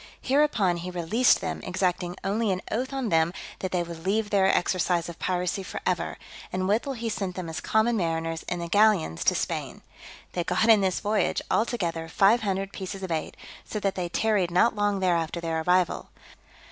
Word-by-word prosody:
Hereupon 255 -11 +2
he 175 +2 -5
released 180 +8 +2
them, - - -3
exacting 180 -1 -1
only 210 +3 0
an 185 0 -2
oath 255 +5 -1
on 265 -4 -2
them 160 -1 +3 0.3
that 185 - -3
they 180 -1 +1
would 170 -1 -9
leave 205 +3 0
their 195 -2 +4
exercise 180 -2 +1
of 170 - -9
piracy 180 +1 -1
for 190 - -6
ever; - - -1 0.3
and 185 0 -1
withal 230 +7 +1
he 235 -2 -4
sent 195 -4 -3
them 185 -2 -5
as 160 - -5
common 220 +2 +2
mariners, 165 -2 -1
in 175 - -1
the 170 0 -4
galleons, 200 - +3
to - - +4
Spain. - - -3 0.5
They 175 - -2
got 220 +6 +1
in 220 -3 +7
this 190 -2 0
voyage, 210 +1 +1
all 225 - +3
together, 165 -8 -3
five 200 +7 +4
hundred 195 -1 -2
pieces 195 0 -6
of 185 - -4
eight; 160 -1 -3 0.3
so 215 - -5
that 195 -1 0
they 180 -2 -3
tarried 205 -2 +1
not 200 +7 +3
long 205 -1 0
there 180 -2 +3
after 165 +1 -2
their 165 -1 -2
arrival. 180 +1 +1
185 Hz, 195 wpm, -26 LUFS, 175-215 Hz, 0.5 s, in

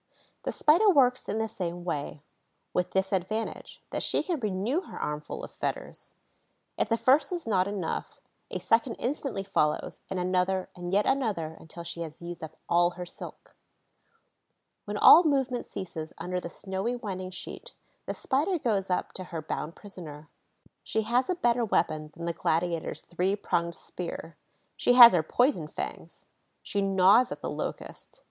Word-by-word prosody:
The - - 0
Spider 345 +8 +4
works 255 -7 +3
in - - -1
the 220 0 0
same 175 -4 -5
way, 150 -3 -4 0.5
with 180 - 0
this 190 0 0
advantage, 215 +4 -3
that - - -2
she - - +1
can 345 -5 -2
renew 215 - 0
her - - -9
armful 150 0 -4
of - - -7
fetters. - - -5 0.6
If - - 0
the 230 - +2
first 275 +6 +4
is 350 -2 -3
not 190 -4 +2
enough, 200 -5 -4 0.3
a - - -3
second 230 +1 +2
instantly 265 -6 -3
follows, 150 -5 0
and 190 - -2
another 185 +1 0
and 175 0 -5
yet 205 +2 +3
another 205 - 0
until 170 +1 -10
she 170 0 -6
has 160 -2 -6
used 170 -1 -7
up 160 0 -8
all 175 0 +4
her 180 - -4
silk. 175 - -11 1.3
When - - -3
all 345 - +9
movement 270 -5 0
ceases 160 -4 -6
under 180 0 -3
the 170 - -6
snowy 195 +7 -3
winding 190 -5 -5
sheet, 185 - -8 0.3
the - - -3
Spider 315 +8 0
goes 205 - 0
up 180 - -1
to 185 - -5
her 170 -2 -5
bound 155 +1 -4
prisoner. 155 -7 -10 0.5
She 220 - -1
has 245 +6 +1
a 365 - +2
better 240 -6 +2
weapon 155 -7 0
than 170 - -5
the 170 - -1
gladiator's 165 0 -1
three 180 +3 -1
pronged 170 -4 -1
spear: 165 -2 -7 0.4
she 245 - +3
has 240 -3 +11
her 175 - +4
poison 245 - +1
fangs. - - -7 0.4
She 205 - -1
gnaws 195 +5 +5
at - - -6
the - - -2
Locust. - - -6
190 Hz, 165 wpm, -28 LUFS, 170-240 Hz, 1.3 s, has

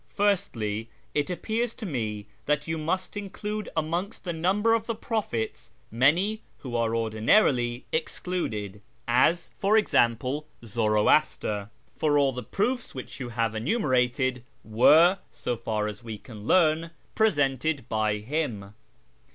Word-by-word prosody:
Firstly, 115 - 0 0.2
it 145 +2 0
appears 220 +6 -2
to 225 - -7
me 110 - -3 0.2
that 150 +1 +1
you 160 0 -2
must 185 +6 -2
include 210 +1 -4
amongst 170 +7 -2
the 175 - -3
number 195 +7 +2
of 225 -1 0
the 230 - -1
prophets 120 - -3 0.2
many 170 - +2 0.2
who 125 -3 -5
are 115 -1 +1
ordinal 115 - +3
ily 120 -2 -2
excluded, 110 - -3 0.3
as, 130 +9 +3
for 205 +2 +4
example, 130 - +2 0.2
Zoroaster; 105 -1 +2 0.3
for 150 -2 +3
all 140 -2 +4
the 125 -1 -5
proofs 235 - -2
which 130 - -8
you 125 -3 -4
have 115 -2 -1
enumerated 130 - +1 0.2
were, 160 - +5
so 120 - -3
far 110 -2 -2
as 105 +3 -6
we 110 -2 -6
can 105 -1 -11
learn, 165 -2 +3 0.2
presented 145 - +1
by 110 -1 0
him. 105 -4 -3
140 Hz, 135 wpm, -27 LUFS, 115-185 Hz, 0.3 s, were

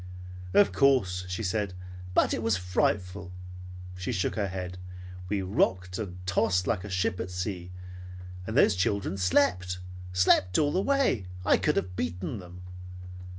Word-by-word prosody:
"Of 100 -1 +6
course," 95 -5 +2
she 95 +5 -3
said, 100 -1 -1 0.4
"but - - +4
it - - -1
was 110 -3 +2
frightful." 90 0 -1 0.6
She 90 0 -3
shook 90 - 0
her 100 0 -1
head. 90 -1 -5 0.5
"We 100 -1 0
rocked 95 -1 0
and 90 -5 -5
tossed 90 0 +2
like 100 -5 0
a 105 - -7
ship 95 -1 0
at 90 - -3
sea. 90 -1 -4 0.8
And - - -2
those - - +6
children 100 0 0
slept. 90 -2 +2 0.3
Slept 90 0 +3
all 145 -1 +3
the 185 - +1
way. 265 - +1 0.2
I - - +5
could - - +1
have 90 +1 -2
beaten 90 +6 -3
them!" 90 0 -11
95 Hz, 150 wpm, -28 LUFS, 90-105 Hz, 0.8 s, Of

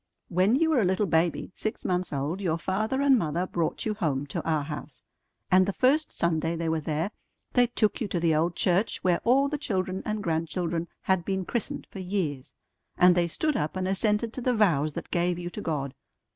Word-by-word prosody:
When 185 +6 +3
you 320 +3 +2
were 290 - +4
a - - +3
little 190 +3 +2
baby 165 0 +1
six 215 - -4
months 180 0 -1
old, 145 +7 -2
your 170 -4 0
father 215 +10 -1
and 270 -3 +5
mother 170 +1 -1
brought 170 -3 -2
you 215 - 0
home 150 -9 -1
to - - -1
our 155 -3 0
house; 145 -4 -7 0.5
and 185 0 +5
the 200 - 0
first 285 +8 +2
Sunday 165 0 0
they 165 0 -2
were 160 0 +1
there 160 +5 -2 0.4
they 245 -1 +4
took 225 0 0
you 220 - 0
to 180 - -1
the 165 -1 +2
old 165 +3 +1
church 185 +5 +1
where 180 -2 +2
all 265 +4 +4
the 295 +1 -3
children 190 -7 -2
and 215 -1 -3
grandchildren 165 +1 -1 0.2
had 190 -2 +1
been 190 0 -2
christened 235 +4 -3
for 195 - -8
years, 180 -8 -3 0.4
and 180 0 +7
they 175 -1 +2
stood 305 - -1
up 150 -4 -1
and 185 0 -1
assented 210 +4 +1
to 255 - -5
the 250 0 +1
vows 155 -9 +2
that - - -7
gave 175 0 +1
you 175 0 -5
to 210 - -6
God. 140 -7 -2
180 Hz, 215 wpm, -27 LUFS, 165-215 Hz, 0.5 s, and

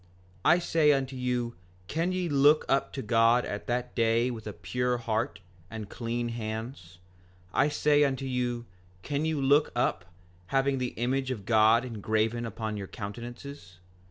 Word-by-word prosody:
5:19 - - +5
I 175 - +6
say 165 -3 +3
unto 135 -1 -2
you, 125 -2 -2 0.3
can 165 - -1
ye 185 -1 -1
look 145 +1 +4
up 135 0 +1
to 135 - -4
God 115 +2 +4
at 100 - -5
that 125 0 -2
day 115 +1 +2
with 110 -2 -7
a - - -3
pure 125 +9 -1
heart 115 -1 -2 0.3
and 110 -2 -7
clean 120 0 -3
hands? 110 -5 -6 0.6
I 145 +2 +3
say 150 0 +3
unto 135 -1 0
you, 125 -2 -2 0.4
can 145 +1 -1
you 160 -2 0
look 140 +2 +3
up, 110 -6 0 0.4
having 135 +2 +1
the 125 -1 -3
image 130 +3 0
of 110 -7 -4
God 110 +2 +4
engraven 110 0 -1
upon 110 -1 -4
your 100 -1 -5
countenances? 120 -1 -8
120 Hz, 160 wpm, -28 LUFS, 110-135 Hz, 0.6 s, I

